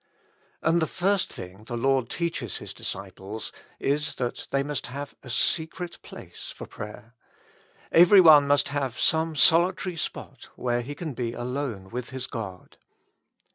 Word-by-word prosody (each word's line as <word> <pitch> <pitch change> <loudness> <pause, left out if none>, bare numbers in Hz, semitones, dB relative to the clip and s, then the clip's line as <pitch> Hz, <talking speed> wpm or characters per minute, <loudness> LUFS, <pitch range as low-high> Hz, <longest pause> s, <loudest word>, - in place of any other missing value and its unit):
And 165 +1 +3
the 160 - +1
first 190 +1 +1
thing 95 +4 -9
the 120 +1 -4
Lord 130 -1 +2
teaches 165 - -2
His - - -7
disciples 100 +2 -6 0.3
is 145 +2 0
that 125 -2 -3
they 140 0 +1
must 145 -4 -3
have 140 +3 -6
a 130 - -11
secret 165 +7 -1
place - - -10
for - - -9
prayer; 110 +2 -9 0.8
every 180 +4 +8
one 155 -5 +8
must 145 0 +3
have 140 -4 -2
some 160 0 +2
solitary 175 +4 +4
spot 165 - -6
where 120 -1 0
he 140 +4 -6
can 155 -2 -5
be 120 -1 -3
alone 120 -6 -4
with 125 +1 -4
his 130 -1 -4
God. 95 -6 -7
140 Hz, 150 wpm, -26 LUFS, 120-160 Hz, 0.8 s, every